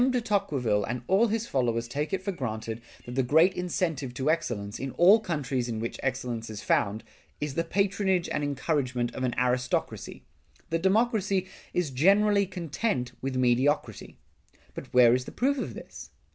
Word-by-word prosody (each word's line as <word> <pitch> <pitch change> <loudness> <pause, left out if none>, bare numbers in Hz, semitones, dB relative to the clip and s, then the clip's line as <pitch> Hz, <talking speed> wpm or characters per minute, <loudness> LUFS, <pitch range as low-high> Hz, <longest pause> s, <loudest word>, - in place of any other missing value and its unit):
de 255 -1 +1
Tocqueville 150 - 0
and 120 +3 -4
all 195 - +4
his 225 +1 -1
followers 120 - 0
take 145 +5 -3
it 190 -1 -2
for 200 - -1
granted 110 - -4 0.2
that 120 - -7
the 130 - +2
great 160 +9 +4
incentive 165 -8 -2
to 135 +4 +1
excellence, 110 -11 -3
in 135 - -3
all 195 +6 +6
countries 135 - -2
in 115 - -3
which 115 +1 -4
excellence 125 -4 -3
is 110 -1 -7
found, 105 +2 +1 0.4
is 150 -2 -3
the 165 - 0
patronage 190 0 +1
and 150 - -1
encouragement 130 -4 -1
of - - -6
an 125 -2 0
aristocracy; 125 - -1 0.5
that 165 0 0
democracy 200 -1 +2 0.2
is 175 -5 -1
generally 200 +8 +4
content 170 - -2
with 135 0 -3
mediocrity. 130 +4 +1 0.6
But - - -9
where 120 -2 +6
is 125 0 0
the - - -8
proof 275 +2 0
of - - -4
this? - - -10
145 Hz, 170 wpm, -28 LUFS, 125-190 Hz, 0.6 s, all